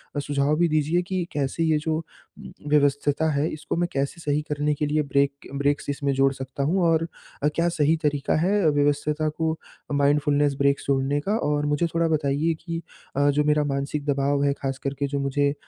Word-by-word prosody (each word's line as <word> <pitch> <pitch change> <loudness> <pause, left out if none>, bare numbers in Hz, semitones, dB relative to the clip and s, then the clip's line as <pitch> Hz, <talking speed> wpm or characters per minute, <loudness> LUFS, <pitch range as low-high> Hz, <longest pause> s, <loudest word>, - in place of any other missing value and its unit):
अ, - - 0
सुझाव 145 +1 +1
भी 170 +1 +3
दीजिए 155 +3 +1
कि 185 0 -2
कैसे 145 +2 -1
ये 160 -1 +3
जो 155 +1 -1
उम, 165 0 -12 0.2
व्यस्तता 145 +1 +2
है 145 +1 +1
इसको 155 +1 -4
मैं 175 +1 +1
कैसे 140 +5 -2
सही 150 -1 0
करने 150 0 +1
के 150 +1 -1
लिए 150 +1 +1
ब्रेक 140 0 +2 0.3
ब्रेक्स 145 +1 0
इसमें 140 0 -1
जोड़ 135 0 +3
सकता 135 +1 -5
हूँ 175 +7 +1
और 165 0 +2 0.4
अ, - - +4
क्या 170 +1 +2
सही 155 -1 +2
तरीका 145 -2 +1
है 190 0 +3
व्यस्तता 145 +1 +1
को 160 +1 -1
अ, 160 - -12
माइंडफुलनेस 145 0 +2
ब्रेक 140 0 +2
जोड़ने 140 +1 +1
का। 200 +8 -1
और 150 -7 0
मुझे 150 +3 +1
थोड़ा 165 0 +2
बताइए 155 +1 +1
कि 165 -1 -5 0.3
अ, 145 +1 +3
जो 145 +1 +2
मेरा 150 0 +2
मानसिक 140 +1 -2
दबाव 140 0 +1
है 140 - +3
खासकर 135 0 -3
के 140 - 0
जो 140 0 -2
मुझे 140 +1 +1
145 Hz, 200 wpm, -24 LUFS, 140-155 Hz, 0.4 s, अ